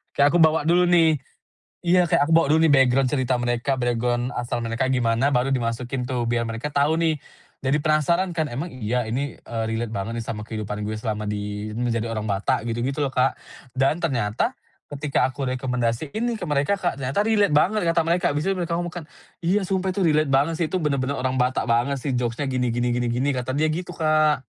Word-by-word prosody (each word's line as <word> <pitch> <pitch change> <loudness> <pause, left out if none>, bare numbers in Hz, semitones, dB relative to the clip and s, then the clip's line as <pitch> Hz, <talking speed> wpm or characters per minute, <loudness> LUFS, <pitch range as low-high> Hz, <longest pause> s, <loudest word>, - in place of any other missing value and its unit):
Kayak 140 - +5
aku - - +5
bawa 160 -1 +3
dulu 175 +2 +4
nih. 165 -3 +5 0.7
Iya 180 0 +4
kayak 170 -3 +3
aku - - +3
bawa 165 -1 +5
dulu 160 +2 +4
nih 160 -2 +5
background 135 -1 +4
cerita 130 -3 +1
mereka 120 +3 0
background 120 0 0
asal 120 0 -2
mereka 115 +3 -1
gimana 125 +1 +1
baru 125 +2 +1
dimasukin 125 0 -2
tuh 125 -2 -2
biar 115 -1 0
mereka 115 +6 -4
tau 145 +2 +2
nih, 160 -2 +1 0.4
jadi 135 +1 0
penasaran 155 +4 +2
kan, 165 -2 -1
"Emang 145 +6 -5
iya 125 -1 -2
ini, 125 +5 -3
eee, 115 -1 -5
relate 115 0 -2
banget 110 +2 -4
nih 115 - -3
sama 105 -1 -6
kehidupan 105 -2 -5
gue 110 - -3
selama 110 -1 -3
di 105 0 -4
menjadi 115 -1 -1
orang 115 -2 -3
Batak?" 100 +3 0
gitu-gitu 130 +6 -2
loh 140 - 0
Kak 130 0 +2 0.4
dan 135 +4 +2
ternyata, 130 - -1 0.4
ketika 140 -3 +1
aku 130 +2 -6
rekomendasiin 125 - -2
nih 240 -1 0
ke - - -5
mereka 145 +6 +1
Kak, 175 -7 -2
ternyata 140 +12 0
relate 210 -2 +3
banget 185 +9 +3
kata 165 0 +2
mereka, 170 +2 +2
habis 145 +3 -2
itu 195 - +2
mereka 170 -2 -2
ngomong 175 0 -4
kan, - - -13 0.4
"Iya 190 +3 +1
sumpah 190 0 0
itu 185 -1 0
relate 155 -2 +2
banget 140 +5 +2
sih - - +2
itu 185 - 0
bener-bener 140 -4 -1
orang 130 0 -1
Batak 125 0 0
banget 120 +4 +1
sih 135 0 -3
jokes-nya 120 +3 -1
gini 125 -2 0
gini 120 +1 0
gini 120 -1 0
gini," 130 +4 0
kata 125 0 -3
dia 155 - +3
gitu 170 +3 -3
Kak. 155 -4 +2
135 Hz, 210 wpm, -23 LUFS, 120-160 Hz, 0.7 s, Kayak